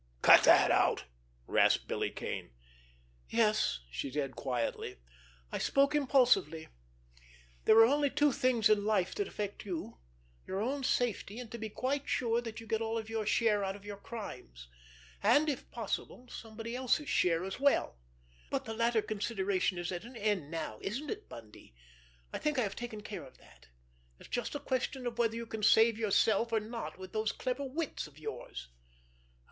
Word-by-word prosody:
"Cut - - +9
that - - +7
out!" - - +3 0.4
rasped - - +3
Billy - - -1
Kane. - - -6 0.8
"Yes," 215 - +2
she 65 - -3
said 135 -1 -2
quietly, 125 -3 -3 0.5
"I - - -2
spoke 275 +1 +3
impulsively. 250 - +3 1.0
There 220 - +6
are 225 - +10
only 285 +3 +2
two 295 +1 +3
things 255 -5 +3
in 210 -1 +3
life 205 -4 +1
that 410 -1 -2
affect 205 -1 -5
you—your - - -7
own 265 +6 -1
safety, 235 -4 0
and 240 -3 -8
to 235 - -6
be 220 0 -4
quite 275 +6 -2
sure 235 -1 +1
that 225 -2 -7
you 225 - -10
get 225 0 -1
all 225 0 -1
of 220 0 -5
your 220 -2 -2
share 215 -3 +3
out 195 0 -2
of 200 0 -13
your 205 0 -6
crimes, 125 - -9 0.5
and, 305 +2 +4
if 280 -5 -3
possible, 235 +2 -4
somebody 225 +1 -7
else's 260 +4 +1
share 170 -7 +2
as 190 +4 -5
well. 280 - +2 0.5
But - - -2
the 225 - -4
latter 230 -1 +2
consideration 195 -3 -1
is 175 +1 -3
at 175 -1 -4
an 245 +2 -11
end 205 -9 -1
now, 155 -10 -4
isn't 265 +10 -3
it, 430 0 -7
Bundy? 110 - -13 0.6
I - - -3
think 300 -2 0
I 250 - +3
have 200 - -3
taken 240 -3 -6
care 210 -1 -7
of 130 - -15
that. 65 - -20 0.5
It's - - -14
just 245 +3 -2
a - - -2
question 260 -1 -2
of 240 -1 -4
whether 230 -1 +2
you 230 0 -4
can 220 -1 -6
save 225 +1 +5
yourself 220 +1 +2
or 225 - +3
not 225 0 -6
with 185 +2 -10
those 215 -1 0
clever 255 +2 -3
wits 280 - -3
of 150 -1 -19
yours. 65 - -7
220 Hz, 175 wpm, -32 LUFS, 190-245 Hz, 1.0 s, are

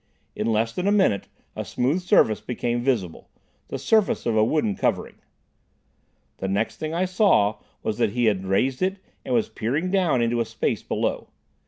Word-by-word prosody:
In - - -2
less 115 0 +1
than 180 +2 -2
a - - +4
minute 190 - +2 0.3
a - - -3
smooth 140 +9 0
surface 180 - +3
became 120 -1 -2
visible—the 120 +1 -4
surface 210 - +1
of 115 -2 +1
a 110 - +4
wooden 115 -3 +1
covering. - - -1 1.2
The 95 - -3
next 100 +3 -1
thing 155 0 -4
I 180 +2 +1
saw 185 - +3 0.2
was - - -2
that 100 - +1
he 120 -1 +1
had 100 -4 +1
raised 125 +7 +1
it 190 +1 0 0.3
and 125 - -1
was 115 - +2
peering 145 +11 -2
down 180 -11 +2
into 115 0 +1
a - - 0
space - - -2
below. - - -2
120 Hz, 175 wpm, -24 LUFS, 110-180 Hz, 1.2 s, a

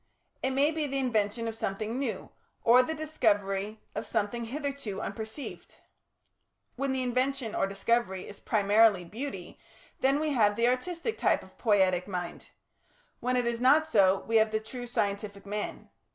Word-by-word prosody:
It 265 - +1
may 275 +3 +3
be 310 -2 -1
the 275 0 -2
invention 230 -3 0
of 225 - -2
something 220 +3 -3
new 230 -8 -3 0.3
or 240 +2 +7
the 320 +5 -2
discovery 215 -9 0
of - - -4
something 225 +2 -1
hitherto 275 -5 -4
unperceived. 220 +5 -6 1.0
When 275 +1 -1
the 260 -1 0
invention 255 -1 0
or - - +1
discovery 195 -1 0
is 200 - -10
primarily 205 -2 +3
beauty 210 -1 -6 0.4
then 270 +2 +3
we 310 0 0
have 210 -6 +3
the 235 +2 +2
artistic 335 - -1
type - - +2
of - - -17
Poietic 190 -5 +3
mind; 180 -3 -5 0.7
when 250 +1 0
it 245 - +1
is 235 0 -1
not 290 +5 +5
so, 195 -9 +4
we 225 0 +1
have 220 0 +4
the 220 0 0
true 245 +3 -7
scientific 200 -2 -2
man. 210 +1 -5
230 Hz, 160 wpm, -29 LUFS, 205-265 Hz, 1.0 s, or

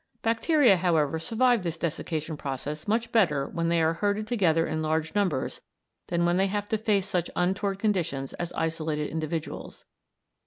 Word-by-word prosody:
Bacteria, 230 - +4
however, 160 -3 +1
survive 240 +5 +2
this 170 -2 -3
desiccation 160 -1 -3
process 145 +3 -5
much 230 +2 0
better 155 -11 +3
when 165 0 -1
they 170 -1 +3
are 160 +1 +3
herded 205 +4 0
together 180 -8 +2
in 155 0 -2
large 155 0 -1
numbers 185 -10 0 0.5
than 170 0 +1
when 175 +1 +2
they 195 +1 +3
have 205 +1 -2
to 220 - +1
face 205 -3 +1
such 180 -4 -1
untoward 190 +2 0
conditions 170 -10 -1
as 175 -1 -4
isolated 160 -2 -2
individuals. 160 0 -5
170 Hz, 160 wpm, -27 LUFS, 160-205 Hz, 0.5 s, Bacteria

